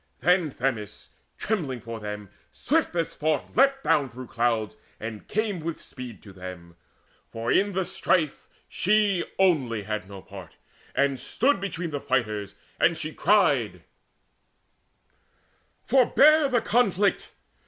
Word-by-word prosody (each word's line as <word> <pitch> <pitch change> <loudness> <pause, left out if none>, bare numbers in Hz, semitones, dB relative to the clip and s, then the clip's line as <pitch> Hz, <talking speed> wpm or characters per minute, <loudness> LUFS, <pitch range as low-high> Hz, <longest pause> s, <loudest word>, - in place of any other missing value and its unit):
Then 175 +2 +3
Themis, 115 -6 -4 0.3
trembling 155 - -2
for 115 0 -7
them, 105 -1 -6 0.2
swift 315 - 0
as 165 -2 -1
thought 155 -2 -1
Leapt 270 +2 +4
down 140 -2 +2
through 125 +2 -9
clouds, 115 -3 -1 0.2
and 110 -1 -7
came 210 -3 -1
with 165 0 -4
speed 125 -3 -10
to 100 - -12
them 90 -2 -9 0.5
For 115 +1 -3
in 200 +1 +2
the 190 0 0
strife 160 -5 0 0.2
she 205 -2 +2
only 135 - +2
had 105 -1 -4
no 100 -1 -10
part 95 -3 -11 0.4
And 140 -2 +1
stood 245 - +1
between 180 -4 -4
the 145 -1 -3
fighters, 105 -5 -1 0.2
and 170 -1 +3
she 155 -1 -4
cried: 130 - +2 2.0
"Forbear 280 +4 +5
the 245 -3 +2
conflict! 205 -4 +1
145 Hz, 130 wpm, -26 LUFS, -, 2.0 s, Forbear